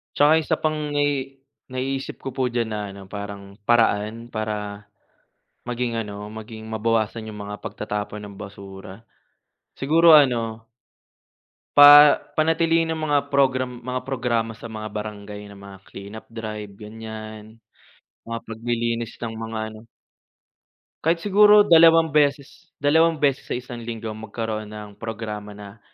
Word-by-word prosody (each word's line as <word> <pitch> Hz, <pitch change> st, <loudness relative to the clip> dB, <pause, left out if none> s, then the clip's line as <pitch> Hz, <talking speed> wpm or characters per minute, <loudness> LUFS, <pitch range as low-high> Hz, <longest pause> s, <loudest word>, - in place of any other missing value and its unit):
Tsaka 145 Hz, +2 st, +5 dB
isa -, -, 0 dB
pang 155 Hz, -1 st, -1 dB, 0.2 s
nai 140 Hz, -2 st, -1 dB, 0.3 s
naiisip 135 Hz, +1 st, -3 dB
ko -, -, -1 dB
po 130 Hz, -1 st, 0 dB
diyan 120 Hz, -2 st, -1 dB
na 105 Hz, -, -2 dB
ano, 100 Hz, 0 st, -10 dB
parang 100 Hz, 0 st, -8 dB
paraan 115 Hz, 0 st, +1 dB
para, 105 Hz, -2 st, -4 dB, 0.8 s
maging 120 Hz, -1 st, -2 dB
ano, 105 Hz, 0 st, -8 dB
maging 110 Hz, 0 st, -9 dB
mabawasan 110 Hz, 0 st, -1 dB
'yong 105 Hz, -1 st, -9 dB
mga 105 Hz, -, -5 dB
pagtatapon 105 Hz, -1 st, -4 dB
ng 100 Hz, -, -12 dB
basura, 95 Hz, 0 st, -10 dB, 0.7 s
siguro 165 Hz, +4 st, +5 dB
ano 115 Hz, -6 st, +3 dB, 1.1 s
pa 145 Hz, 0 st, +10 dB, 0.2 s
panatilihin 165 Hz, +1 st, +2 dB
ang 160 Hz, -1 st, -2 dB
mga 145 Hz, -2 st, +1 dB
program 130 Hz, -2 st, +2 dB, 0.2 s
mga 125 Hz, 0 st, -2 dB
programa 120 Hz, -3 st, -1 dB
sa -, -, -12 dB
mga 110 Hz, -1 st, -6 dB
barangay 105 Hz, -1 st, -7 dB
na 100 Hz, -, -12 dB
mga 100 Hz, -1 st, -11 dB
clean-up 100 Hz, +3 st, -10 dB
drive, 105 Hz, -3 st, -7 dB
ganyan, 110 Hz, +1 st, -10 dB, 0.7 s
mga 115 Hz, 0 st, -3 dB
paglilinis 115 Hz, 0 st, -3 dB
ng 115 Hz, -1 st, -5 dB
mga 115 Hz, 0 st, -5 dB
ano 110 Hz, +1 st, -14 dB, 1.2 s
Kahit 165 Hz, +1 st, +1 dB
siguro 210 Hz, +1 st, +7 dB
dalawang 165 Hz, -3 st, +6 dB
beses 145 Hz, +3 st, 0 dB
dalawang 160 Hz, +2 st, +2 dB
beses 140 Hz, -2 st, +1 dB
sa -, -, -2 dB
isang 125 Hz, -1 st, -7 dB
linggo, 115 Hz, -1 st, -5 dB
magkaroon 110 Hz, 0 st, -5 dB
ng 105 Hz, -1 st, -10 dB
programa 105 Hz, -2 st, -6 dB
na, 105 Hz, +1 st, -12 dB
115 Hz, 130 wpm, -23 LUFS, 105-135 Hz, 1.2 s, pa